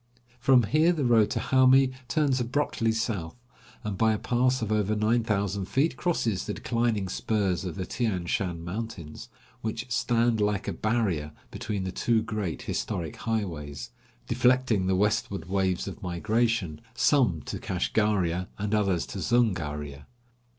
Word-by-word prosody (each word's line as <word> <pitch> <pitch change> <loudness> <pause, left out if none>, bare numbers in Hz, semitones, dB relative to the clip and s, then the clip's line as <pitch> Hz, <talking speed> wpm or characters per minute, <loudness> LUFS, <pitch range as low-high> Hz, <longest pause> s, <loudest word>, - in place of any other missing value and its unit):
From 125 0 +5
here 155 - +3
the 150 -5 -1
road 115 -3 +4
to - - -1
Hami 130 0 +4
turns 135 +1 +1
abruptly 120 -2 0
south, 110 -7 -2 0.5
and 100 -3 -4
by 110 -1 +4
a - - 0
pass 125 +2 +1
of 110 - -3
over 105 0 +1
nine 110 +3 +2
thousand 100 -3 -1
feet 140 - +1
crosses 115 - -1
the 105 - -3
declining 115 -5 0
spurs 95 -2 -1
of 85 -3 -4
the 95 - -3
Tian 100 -7 -2
Shan 85 -1 -2
mountains, 90 -5 -6 0.3
which 110 +2 -3
stand 115 0 +2
like 105 -1 0
a - - -1
barrier 100 -10 -1 0.2
between 100 -3 -3
the 95 - -3
two 115 +3 +1
great 105 -7 -3
historic 80 -4 -3
highways, 80 - -4 0.4
deflecting 125 -6 +2
the 95 - +2
westward 105 -3 0
waves 95 -1 0
of 95 -5 -7
migration, 105 -1 0
some 115 - +3
to - - -5
Kashgaria 95 -5 0
and 105 +1 -2
others 100 -5 +1
to - - -7
Zungaria. 75 -11 -1
105 Hz, 150 wpm, -27 LUFS, 95-120 Hz, 0.5 s, From